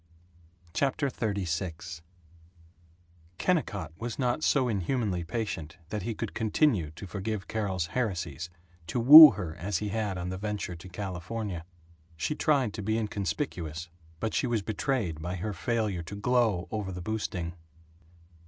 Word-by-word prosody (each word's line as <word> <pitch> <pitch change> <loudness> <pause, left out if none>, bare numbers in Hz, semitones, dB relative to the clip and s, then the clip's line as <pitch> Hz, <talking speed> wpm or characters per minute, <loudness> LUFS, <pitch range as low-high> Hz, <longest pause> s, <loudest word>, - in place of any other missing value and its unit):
CHAPTER 140 0 0
XXXVI 90 -6 -3 1.4
KENNICOTT 105 - 0
was 115 -1 -4
not 125 +3 0
so 135 -3 +3
inhumanly 100 -3 -1
patient 85 -4 -4
that 105 +1 -3
he 110 +4 -3
could 115 -1 -4
continue 110 - +2
to 100 - -8
forgive 100 +1 -4
Carol's 95 -6 -1
heresies, 85 - -3 0.4
to 85 - -1
woo 150 +6 +13
her 90 -5 -5
as 100 +4 -1
he 105 - -3
had 105 -2 -2
on 90 0 -3
the 95 0 -4
venture 105 -3 -3
to 90 +3 -11
California. 95 -1 -4 0.5
She 115 - -1
tried 140 -8 +2
to 110 - -5
be 110 +2 0
inconspicuous, 90 - -3 0.3
but 110 +3 -2
she - - +1
was 115 -4 0
betrayed 105 - -1
by 90 +3 -3
her 100 +4 -3
failure 105 0 -1
to 85 +5 -8
glow 110 -5 +1
over 105 -3 -3
the 90 -1 -6
boosting. 90 -5 -3
100 Hz, 145 wpm, -29 LUFS, 90-115 Hz, 1.4 s, woo